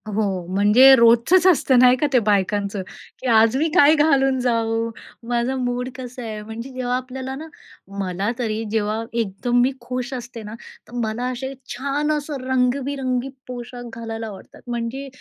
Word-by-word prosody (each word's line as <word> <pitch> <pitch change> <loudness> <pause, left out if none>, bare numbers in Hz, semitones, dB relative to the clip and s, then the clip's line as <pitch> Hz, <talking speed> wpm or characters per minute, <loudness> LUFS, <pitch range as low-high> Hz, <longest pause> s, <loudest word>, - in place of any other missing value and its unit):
हो, 200 -4 -1
म्हणजे 215 +7 +7
रोजचंच 235 +10 +5
असतं, 275 -7 +4
नाही 250 0 +7
का, 295 - +1
ते 255 - +6
बायकांचं, 205 -1 0 0.4
की 260 - -5
आज 225 +1 +5
मी 310 +4 +2
काय 290 +2 +7
घालून 270 -3 +3
जाऊ? 230 -2 0 0.4
माझा 240 +2 0
मूड 250 0 -2
कसा 250 -1 -8
आहे, 215 -2 -5
म्हणजे 225 +4 -8
जेव्हा 250 -1 -2
आपल्याला 260 +1 -6
ना 310 +4 -8 0.5
मला 195 +2 -1
तरी 220 -2 -2
जेव्हा 215 0 -1
एकदम 235 +2 0
मी 255 +2 +3
खुश 250 +1 -4
असते 240 -2 -7
ना, 210 +1 -8 0.3
तर - - -16
मला 220 +3 -2
असे 265 +2 -5 0.2
छान, 280 +3 -1
असं 295 -2 -3
रंगबिरंगी 260 0 0 0.2
पोशाख 245 -1 -8
घालायला 225 -1 -5
आवडतात. 200 -3 -12
म्हणजे 240 +3 -4
245 Hz, 160 wpm, -22 LUFS, 225-260 Hz, 0.5 s, म्हणजे